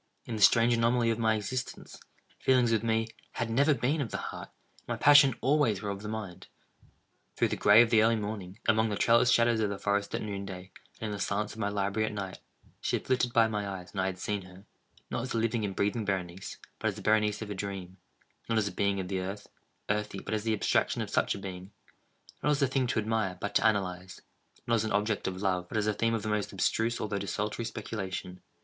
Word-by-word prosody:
In 115 Hz, -, -4 dB
the 110 Hz, -, -4 dB
strange 115 Hz, +3 st, +6 dB
anomaly 115 Hz, 0 st, +2 dB
of 115 Hz, -, -2 dB
my 110 Hz, -1 st, +3 dB
existence, 125 Hz, +4 st, -5 dB, 0.4 s
feelings 125 Hz, -3 st, +3 dB
with 110 Hz, -2 st, +2 dB
me, 115 Hz, 0 st, +1 dB, 0.2 s
had 115 Hz, -1 st, -2 dB
never 140 Hz, +5 st, +4 dB
been 135 Hz, +5 st, 0 dB
of 125 Hz, -, -3 dB
the -, -, -3 dB
heart, -, -, -6 dB, 0.3 s
and -, -, -36 dB
my -, -, -2 dB
passions 140 Hz, -3 st, +7 dB
always 135 Hz, -7 st, +2 dB
were 100 Hz, -, -2 dB
of 100 Hz, 0 st, -6 dB
the 105 Hz, -, -6 dB
mind. 105 Hz, -5 st, -6 dB, 0.9 s
Through -, -, +2 dB
the -, -, -1 dB
gray 110 Hz, +3 st, +7 dB
of 115 Hz, -, -2 dB
the 110 Hz, -, +6 dB
early 115 Hz, +1 st, +4 dB
morning—among 110 Hz, +1 st, -1 dB
the 105 Hz, -, -1 dB
trellised 120 Hz, +3 st, +4 dB
shadows 115 Hz, -1 st, +4 dB
of 105 Hz, -2 st, +1 dB
the 100 Hz, -, -3 dB
forest 100 Hz, 0 st, -1 dB
at -, -, -3 dB
noonday—and 100 Hz, 0 st, -8 dB
in 105 Hz, -, -3 dB
the 100 Hz, -, -4 dB
silence 105 Hz, +2 st, -1 dB
of 110 Hz, -, -11 dB
my 100 Hz, -2 st, 0 dB
library 100 Hz, +2 st, 0 dB
at 110 Hz, -, -5 dB
night—she 95 Hz, -2 st, -6 dB
had -, -, -4 dB
flitted 125 Hz, -1 st, +1 dB
by 115 Hz, -2 st, +5 dB
my 105 Hz, -2 st, -3 dB
eyes, 90 Hz, -2 st, -7 dB
and 95 Hz, -, -2 dB
I 95 Hz, -, +1 dB
had 95 Hz, -1 st, -3 dB
seen 105 Hz, +2 st, -2 dB
her—not 95 Hz, +4 st, -10 dB
as 125 Hz, -, -5 dB
the -, -, 0 dB
living 115 Hz, 0 st, 0 dB
and 100 Hz, -2 st, -3 dB
breathing 105 Hz, +4 st, 0 dB
Berenice, 95 Hz, -2 st, -4 dB, 0.2 s
but 110 Hz, -, -1 dB
as 105 Hz, -, -1 dB
the 105 Hz, -, -9 dB
Berenice 105 Hz, 0 st, +2 dB
of 105 Hz, -, -7 dB
a -, -, -1 dB
dream; 95 Hz, -2 st, -6 dB, 0.5 s
not 115 Hz, -, +2 dB
as 105 Hz, -2 st, +2 dB
a -, -, -3 dB
being 100 Hz, +1 st, 0 dB
of 95 Hz, -, -3 dB
the 95 Hz, 0 st, -2 dB
earth, 95 Hz, +3 st, -5 dB, 0.4 s
earthy, 105 Hz, -1 st, -1 dB
but 105 Hz, -, -5 dB
as 105 Hz, -1 st, -1 dB
the 110 Hz, -1 st, +1 dB
abstraction -, -, +1 dB
of -, -, -8 dB
such -, -, +1 dB
a -, -, -6 dB
being; 95 Hz, -1 st, -7 dB, 0.7 s
not -, -, +1 dB
as 145 Hz, -1 st, +2 dB
a -, -, +6 dB
thing 130 Hz, -1 st, 0 dB
to 120 Hz, -, -1 dB
admire, 110 Hz, -4 st, -1 dB
but 105 Hz, -, -4 dB
to -, -, +3 dB
analyze; 95 Hz, -3 st, -2 dB, 0.5 s
not 115 Hz, -, 0 dB
as 115 Hz, -2 st, +3 dB
an 110 Hz, -, -2 dB
object 105 Hz, +1 st, 0 dB
of 95 Hz, +1 st, -4 dB
love, 90 Hz, -2 st, 0 dB
but -, -, -3 dB
as 105 Hz, -, +1 dB
the 105 Hz, -, +1 dB
theme 115 Hz, +2 st, +1 dB
of 110 Hz, -, -3 dB
the -, -, -3 dB
most 105 Hz, -1 st, -1 dB
abstruse 115 Hz, +4 st, 0 dB
although 105 Hz, -1 st, -2 dB
desultory 105 Hz, +3 st, -3 dB
speculation. 95 Hz, -5 st, -5 dB
105 Hz, 235 wpm, -30 LUFS, 100-115 Hz, 0.9 s, passions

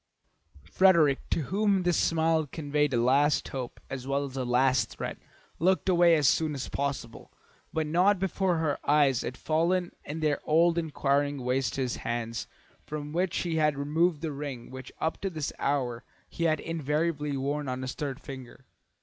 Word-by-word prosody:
Frederick, 170 Hz, -, +4 dB
to -, -, +1 dB
whom 195 Hz, +3 st, +1 dB
this 175 Hz, -1 st, +2 dB
smile 160 Hz, -1 st, +2 dB
conveyed 150 Hz, -2 st, 0 dB
a 125 Hz, -, +1 dB
last 140 Hz, +5 st, +3 dB
hope 130 Hz, -3 st, -6 dB
as 135 Hz, -1 st, -6 dB
well 140 Hz, +1 st, 0 dB
as 135 Hz, -1 st, -9 dB
a 130 Hz, -, -1 dB
last 125 Hz, +1 st, +2 dB
threat, -, -, -6 dB, 0.4 s
looked 185 Hz, +5 st, +2 dB
away 175 Hz, -2 st, +5 dB
as 150 Hz, -4 st, +3 dB
soon 155 Hz, +1 st, +2 dB
as 135 Hz, -, -5 dB
possible, 135 Hz, -5 st, -4 dB, 0.4 s
but 160 Hz, -1 st, -1 dB
not 180 Hz, +6 st, +3 dB
before 185 Hz, -1 st, 0 dB
her 155 Hz, -3 st, 0 dB
eyes 145 Hz, -4 st, +4 dB
had 130 Hz, -, -5 dB
fallen 175 Hz, +3 st, +1 dB
in 150 Hz, +3 st, -5 dB
their 150 Hz, -2 st, +1 dB
old 165 Hz, +2 st, +3 dB
inquiring 145 Hz, -3 st, 0 dB
way 125 Hz, +2 st, +1 dB
to 130 Hz, +1 st, -2 dB
his 125 Hz, -2 st, -1 dB
hands, 115 Hz, 0 st, -3 dB, 0.4 s
from 150 Hz, 0 st, -6 dB
which 175 Hz, +1 st, 0 dB
he 165 Hz, -2 st, -1 dB
had 150 Hz, -2 st, +2 dB
removed 150 Hz, +3 st, +1 dB
the 160 Hz, -2 st, -2 dB
ring 140 Hz, -4 st, -6 dB
which 130 Hz, -1 st, -9 dB
up 160 Hz, -, -2 dB
to 195 Hz, -, -1 dB
this 155 Hz, -5 st, -4 dB
hour 125 Hz, -4 st, -1 dB, 0.2 s
he 170 Hz, -, -3 dB
had 155 Hz, -1 st, +2 dB
invariably 150 Hz, -2 st, -1 dB
worn 140 Hz, +1 st, -2 dB
on 130 Hz, 0 st, -3 dB
his 130 Hz, -, -3 dB
third 140 Hz, -3 st, -4 dB
finger. 130 Hz, -2 st, -10 dB
150 Hz, 175 wpm, -28 LUFS, 135-165 Hz, 0.4 s, away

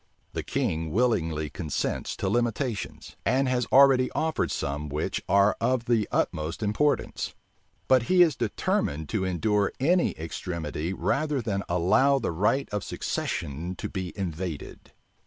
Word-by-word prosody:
The -, -, -2 dB
king 80 Hz, 0 st, -1 dB
willingly 80 Hz, -10 st, +1 dB
consents 80 Hz, -3 st, -2 dB
to -, -, -2 dB
limitations, 120 Hz, -2 st, -2 dB
and 135 Hz, +1 st, +2 dB
has 125 Hz, -2 st, 0 dB
already 135 Hz, -2 st, +6 dB
offered 160 Hz, 0 st, 0 dB
some 75 Hz, +1 st, -3 dB
which 75 Hz, +2 st, -2 dB
are 100 Hz, +1 st, +4 dB
of 125 Hz, -2 st, +1 dB
the 115 Hz, -3 st, +2 dB
utmost 80 Hz, +7 st, -1 dB
importance: 125 Hz, +8 st, 0 dB, 0.5 s
but 130 Hz, -1 st, +5 dB
he 180 Hz, -1 st, +7 dB
is 160 Hz, -6 st, +2 dB
determined 80 Hz, -9 st, -1 dB
to 105 Hz, -, -1 dB
endure 100 Hz, +3 st, +1 dB
any 175 Hz, +7 st, +3 dB
extremity 80 Hz, 0 st, -4 dB
rather 145 Hz, +8 st, 0 dB
than 105 Hz, -4 st, -1 dB
allow 105 Hz, +11 st, +4 dB
the 120 Hz, -, -1 dB
right 105 Hz, +11 st, +1 dB
of 105 Hz, -1 st, -2 dB
succession 80 Hz, +6 st, -3 dB
to -, -, -4 dB
be 95 Hz, -3 st, -4 dB
invaded. 90 Hz, -4 st, -5 dB
105 Hz, 140 wpm, -27 LUFS, 85-130 Hz, 0.5 s, he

